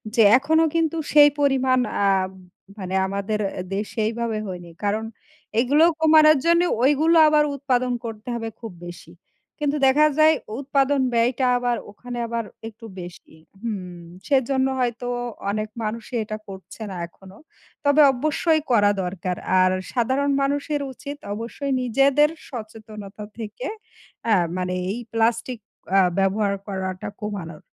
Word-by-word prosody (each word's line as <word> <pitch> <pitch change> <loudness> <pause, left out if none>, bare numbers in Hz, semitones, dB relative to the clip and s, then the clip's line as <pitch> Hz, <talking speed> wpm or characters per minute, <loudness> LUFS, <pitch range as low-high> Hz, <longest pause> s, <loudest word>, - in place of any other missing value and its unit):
যে, 230 - +5 0.2
এখনও 320 +4 +2
কিন্তু 330 0 +1 0.2
সেই 290 -1 +8
পরিমাণ 265 -2 +3 0.3
আ - - +4 0.7
মানে 190 -1 -4
আমাদের 200 +2 -2 0.4
দেশে 210 +2 -4
এইভাবে 230 -1 -2
হয়নি। 175 -2 -7
কারণ 210 +2 0 0.6
এগুলো 285 +6 +4 0.2
কমানোর 310 -1 +6
জন্নে, 340 +1 +4 0.2
ওইগুলো 305 +5 +4
আবার 300 0 +4
উৎপাদন 255 -2 0
করতে 225 +1 -7
হবে 225 -1 -4
খুব 225 -4 -7 0.2
বেশি। 175 - -11 0.5
কিন্তু 295 0 0
দেখা 295 +3 +5
যায়, 310 0 +6 0.2
উৎপাদন 275 0 +1
ব্যয়টা 240 +2 +2
আবার 245 -1 0 0.2
ওখানে 245 +3 -8
আবার 230 0 -2 0.2
একটু 225 +1 -12
বেশি 175 -2 -11 0.3
হুম। 185 -6 -5 0.3
সেজন্য 265 -1 +2
হয়তো 245 0 -1 0.4
অনেক 215 +1 -2
মানুষে 225 +3 -5
এটা 215 0 -5
করছে 195 +3 -11
না - - -6
এখনও। 190 +3 -16 0.5
তবে 285 +2 +5
অবশ্যই 310 +4 +1
করা 205 -3 +5
দরকার। 180 0 -3 0.2
আর 185 0 +4 0.2
সাধারণ 260 +4 +1
মানুষের 285 +1 -1
উচিত, 285 +3 -8 0.2
অবশ্যই 235 +6 -4
নিজেদের 275 +4 +3 0.2
সচেতনতা 215 -4 -9
থেকে, 230 - -6 0.6
আ - - +5 0.2
মানে 180 0 -2 0.2
এই 215 +5 -3
প্লাস্টিক 230 +2 0 0.4
আ - - +7 0.2
ব্যবহার 200 +1 +1
করাটা 190 -2 -4
কমানোর। 185 -7 -6
235 Hz, 130 wpm, -23 LUFS, 205-280 Hz, 0.7 s, সেই